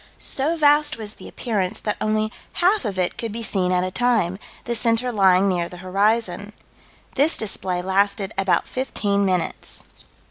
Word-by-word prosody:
So 305 +5 -1
vast 295 -2 +3
was 215 -2 -6
the - - -12
appearance 200 -7 -2
that 210 - -2
only 215 0 0 0.2
half 370 - +2
of 200 -3 -3
it 180 -1 -1
could 230 -2 -3
be 230 +2 -5
seen 185 -4 0
at 180 0 +2
a 185 - -3
time, 215 -6 +1 0.3
the 240 - -1
center 235 +1 +2
lying 195 -3 +4
near 175 -3 0
the 180 - -10
horizon. 205 +2 0 0.6
This 290 +5 +3
display 185 -4 -2
lasted 200 +1 0
about 195 -1 +1
fifteen 205 -6 -1
minutes. 180 -3 -3
205 Hz, 165 wpm, -22 LUFS, 185-235 Hz, 0.6 s, lying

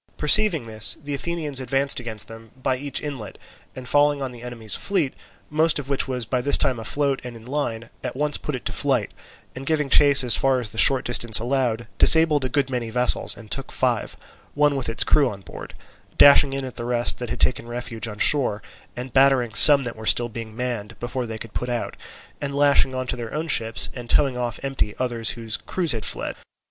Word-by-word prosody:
Perceiving 160 - +3
this, 110 -1 -2
the 145 0 -6
Athenians 150 -2 -2
advanced 135 +2 0
against 115 -3 -3
them 115 0 -13
by 130 0 -1
each 140 +2 -3
inlet, 135 -8 -7 0.4
and 130 -1 -9
falling 145 +1 +2
on 135 -2 -5
the 120 -1 -13
enemy's 115 -4 -3
fleet, 175 - -1 0.4
most 155 +1 +2
of 140 -2 -6
which 140 0 0
was 125 -3 -3
by 125 +3 -2
this 140 +3 +2
time 130 -4 0
afloat 140 +4 -2
and 125 -1 -9
in 115 -1 -14
line, 120 -4 -5
at - - -5
once 150 +2 -1
put 150 - -4
it 125 - -9
to - - -1
flight, 130 -7 -1 0.4
and 130 +1 -9
giving 150 -3 -1
chase 140 -2 +6
as 125 - +4
far 135 -1 +1
as 115 -4 -6
the 110 - -5
short 135 -2 +4
distance 120 -2 +3
allowed, 120 -1 -2
disabled 160 -3 +6
a 130 - -2
good 140 0 0
many 125 -3 -4
vessels 125 +2 +2
and 110 -2 -14
took 135 -1 -5
five, 120 -4 -2 0.4
one 145 0 +2
with 130 -4 -4
its 115 - +1
crew 145 -4 +2
on 100 -3 -10
board; 90 - -11 0.4
dashing 140 -1 +6
in 135 0 -4
at 130 - -10
the 120 - -5
rest 120 0 -1
that 120 -2 -6
had - - -5
taken 120 - 0
refuge 120 -2 -5
on 105 -2 -8
shore, 125 -5 +3 0.3
and 125 0 -8
battering 135 -4 +2
some 140 +5 +9
that 120 -2 -6
were 110 0 -9
still 120 0 +4
being 110 -1 -9
manned, 115 -3 -5
before 120 0 -5
they 110 0 -7
could 110 0 -10
put 125 - -4
out, 120 -1 -4 0.5
and 140 -1 -4
lashing 140 -2 +2
on 130 0 -3
to 125 - -3
their 120 0 -7
own 160 +2 -3
ships 115 -5 +1
and 120 -2 -10
towing 135 -3 +2
off 120 -2 -4
empty 135 -6 -2
others 120 -3 -2
whose 115 -2 -3
crews 175 -5 -1
had 110 -3 -3
fled. - - -1
125 Hz, 220 wpm, -22 LUFS, 115-140 Hz, 0.5 s, some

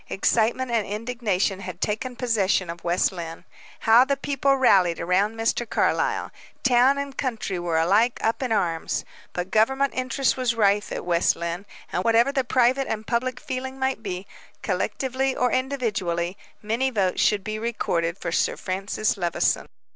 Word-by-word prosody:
Excitement 235 +5 +1
and 225 -3 +1
indignation 210 -3 -1
had 185 -2 -7
taken 230 +4 -2
possession 205 -7 +1
of 170 0 -11
West 175 +1 +2
Lynne. 165 -3 -7 0.4
How 225 +3 +6
the 280 +1 0
people 275 0 +1
rallied 190 -10 +4
around 190 +6 +1
Mr. 225 +1 -1
Carlyle! - - 0 0.3
Town 255 +2 +4
and 280 -1 -4
country 225 -8 -2
were 170 -2 -1
alike 205 +9 +3
up 225 +4 0
in 255 -3 -2
arms. 170 -6 -1 0.3
But 180 +1 -4
government 265 +6 +2
interest 260 +1 0
was 250 -2 0
rife 205 -1 +2
at - - -4
West 175 -1 +2
Lynne, 170 +4 -4 0.3
and, 180 - 0
whatever 230 +4 +4
the 270 -2 0
private 255 +2 +2
and 220 0 -3
public 250 +2 -1
feeling 260 +1 -5
might 265 -3 -1
be, 190 -3 -5 0.4
collectively 260 +7 -1
or 250 0 +1
individually, 210 -10 -1 0.3
many 230 +5 0
votes 195 -7 0
should 205 -2 +2
be 215 +1 -4
recorded 175 -7 -1
for - - -4
Sir - - +1
Francis 195 +3 -2
Levison. 175 -3 0
220 Hz, 160 wpm, -24 LUFS, 185-255 Hz, 0.4 s, How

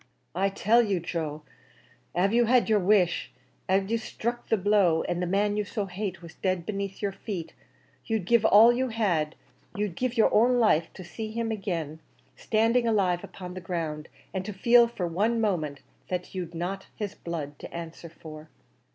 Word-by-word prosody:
"I 195 +3 +1
tell 215 +4 +3
you, 200 -5 0
Joe, 155 -3 -4 0.7
av 195 +4 +2
you 240 0 +4
had 245 +1 +4
your 215 -1 +4
wish 185 -2 +2 0.4
av 195 +2 +2
you 230 - +1
struck 235 +1 -4
the 225 - +3
blow, 195 -4 +3
and 175 0 -2
the 180 - -1
man 205 +3 +1
you 210 - +1
so 205 0 -3
hate 190 -1 -5
was 170 0 -10
dead 185 -2 -2
beneath 200 0 -4
your 200 - +1
feet, 190 -4 -6 0.5
you'd 220 -5 -1
give 235 +2 +4
all 220 +2 +7
you 260 +2 0
had 180 -10 0 0.4
you'd 205 -4 -2
give 250 +2 -2
your 220 - +4
own 245 +3 +4
life 170 -8 +3
to 185 - -9
see 215 +5 -6
him 225 +1 -2
agin, 170 -8 -3 0.4
standing 230 +2 +2
alive 190 -6 +1
upon 180 -1 -8
the 185 - -7
ground, 165 -3 -4 0.2
and 190 -1 -2
to 210 - -5
feel 235 +4 +5
for 215 -6 -4
one 210 +8 0
moment 160 -10 -1 0.3
that 180 -1 -4
you'd 175 -3 -5
not 190 +3 -4
his 205 -2 -4
blood 150 -4 -6
to - - -9
answer 170 0 -8
for." 155 -1 -11
195 Hz, 185 wpm, -27 LUFS, 170-220 Hz, 0.7 s, all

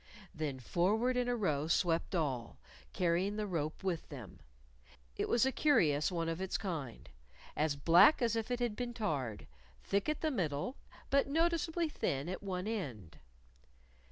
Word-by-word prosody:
Then 145 -4 -3
forward 210 - +1
in 250 0 +1
a 245 - +1
row 155 -9 0
swept 170 +2 +1
all, 135 -8 -2 0.3
carrying 180 +3 +1
the 215 0 -2
rope 160 -5 -3
with 180 -4 -2
them. 125 - -9 0.8
It - - -2
was 240 +2 +4
a 265 - +2
curious 160 - +3
one 165 -2 -1
of 165 +2 -2
its 190 - -1
kind 160 - -5 0.5
as 150 -1 +1
black 170 - +6
as 235 -3 +1
if 225 +1 -2
it 245 0 -1
had 240 -3 -1
been 240 0 -4
tarred, 140 - -2 0.4
thick 200 +7 0
at 305 - -2
the 315 - +1
middle, 170 - -2 0.4
but 275 0 +4
noticeably 330 +2 +1
thin 140 - -2
at 185 - -4
one 185 -2 -3
end. 125 - -5
185 Hz, 160 wpm, -34 LUFS, 150-240 Hz, 0.8 s, black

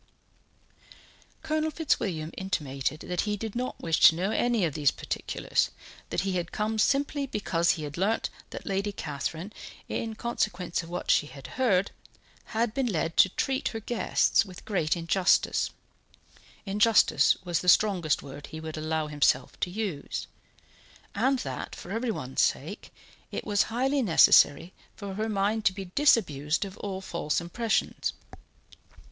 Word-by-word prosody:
Colonel 310 0 0
Fitzwilliam 190 - -1
intimated 150 -6 -2
that 180 -1 -2
he 210 -1 -1
did 220 +1 -5
not 250 +1 -3
wish 165 -1 0
to 160 - +8
know 185 +5 -1
any 235 -3 +2
of 155 - -2
these 145 -2 +3
particulars; - - -1 0.4
that - - 0
he 190 -1 -1
was 175 -2 -1
come 215 +1 -1
simply 280 +3 +1
because 170 -7 +1
he 155 - -6
had 150 +2 -6
learnt 210 +4 0 0.2
that - - -8
Lady 200 +1 -1
Catherine, 160 +4 -5 0.3
in 225 -1 -3
consequence 195 -7 -2
of 165 - -11
what 175 +1 -1
she 150 - +3
had 135 -1 -12
heard, 200 -7 +1 0.5
had 225 0 -1
been 265 0 0
led 165 -5 -1
to 190 - +7
treat 265 +8 -1
her 225 - -3
guests 230 +1 +2
with 185 -4 -12
great 175 -5 0
injustice 175 +3 +2 1.0
injustice 210 +3 +4
was 175 -2 0
the 180 - +1
strongest 180 -7 +3
word 140 +1 -9
he 160 - -8
would 160 0 -6
allow 155 0 -1
himself 150 -1 +1
to - - -1
use 185 -7 -4 0.9
and 260 +6 +2
that, - - -5
for 175 - -9
everyone's 220 - -1
sake, - - -1 0.4
it - - -4
was 205 -1 +2
highly 265 +5 +1
necessary 170 - +5 0.2
for 200 -2 -6
her 215 +3 -2
mind 210 +2 0
to 185 - +3
be 190 -2 -8
disabused 165 - +2
of 195 -1 -9
all 190 -2 -4
false 170 -5 -1
impressions. 215 +6 -1
190 Hz, 150 wpm, -28 LUFS, 165-220 Hz, 1.0 s, to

